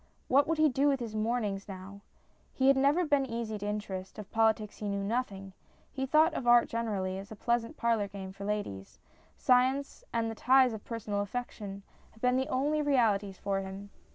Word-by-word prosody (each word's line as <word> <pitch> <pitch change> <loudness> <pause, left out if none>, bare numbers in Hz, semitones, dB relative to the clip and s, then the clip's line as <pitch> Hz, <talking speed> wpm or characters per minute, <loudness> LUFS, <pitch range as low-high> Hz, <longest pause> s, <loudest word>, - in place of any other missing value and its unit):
What 275 +2 +4
would 325 0 0
he 310 0 +5
do 275 +1 +2
with 275 -2 +2
his 230 -3 -5
mornings 215 -3 -1
now? 195 +1 -9 0.5
He 265 0 +4
had 275 - +6
never 285 +6 +3
been 290 -2 +2
easy 230 -4 -4
to 205 - -4
interest; 195 -3 -4
of 210 -3 -9
politics 220 -2 +1
he 210 - -4
knew 200 0 -2
nothing; 200 -4 -3 0.4
he 270 0 -3
thought 310 +4 +4
of 250 - -4
art 240 0 +6
gener 230 -3 -2
ally 185 0 -2
as 195 +2 -9
a - - -6
pleasant 235 +1 -1
parlour 230 -3 +1
game 195 -1 -8
for 195 +1 -10
ladies; 200 - -4 0.4
science 260 +2 +2
and 230 -1 0
the 225 - -3
ties 255 +2 +4
of 215 - -7
personal 215 -3 -3
affection 205 -2 -5 0.3
had 220 - -20
been 250 +2 +2
the 265 +1 0
only 295 +4 +1
realities 215 -9 +2
for 195 -1 -1
him. 195 +1 -8
225 Hz, 200 wpm, -30 LUFS, 200-260 Hz, 0.5 s, had